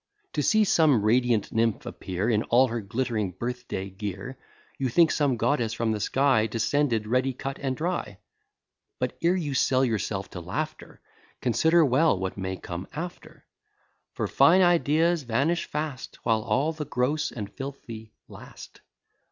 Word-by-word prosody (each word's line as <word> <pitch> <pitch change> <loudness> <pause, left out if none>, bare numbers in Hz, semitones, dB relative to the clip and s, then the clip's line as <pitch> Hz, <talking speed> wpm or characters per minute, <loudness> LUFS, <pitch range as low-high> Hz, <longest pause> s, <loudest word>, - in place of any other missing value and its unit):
To - - 0
see 215 0 +4
some 155 - +3
radiant 115 -1 +2
nymph 115 -1 0
appear 95 +3 -4
In 110 -3 +2
all 125 +2 +4
her 115 0 -3
glitt'ring 110 -3 -2
birth 125 +2 -4
day 95 +1 -4
gear, 100 +5 -6 0.4
You 130 -2 0
think 160 +6 +4
some 140 -5 +1
goddess 120 -4 0
from 115 -1 -1
the 110 - -1
sky 130 0 +2
Descended, 115 +1 0
ready 130 +4 +1
cut 135 +2 -6
and 130 -2 -2
dry: 165 - -3 0.8
But - - -2
ere 170 +2 +3
you 155 -6 -2
sell 130 0 +3
yourself 105 -4 -2
to 90 - -6
laughter, 85 +1 -5 0.4
Consider 160 +7 +3
well 140 - +3
what 95 0 -3
may 95 -1 -4
come 90 +1 -7
after; 170 +4 -8 0.7
For - - -1
fine 170 +7 +5
ideas 170 -1 +3
vanish 140 +8 0
fast, 150 -4 -5
While 110 -1 +2
all 145 +8 0
the 155 -1 -5
gross 140 +4 -1
and 105 -3 -7
filthy 115 -5 -8 0.2
last. - - -13
125 Hz, 155 wpm, -26 LUFS, 110-150 Hz, 0.8 s, fine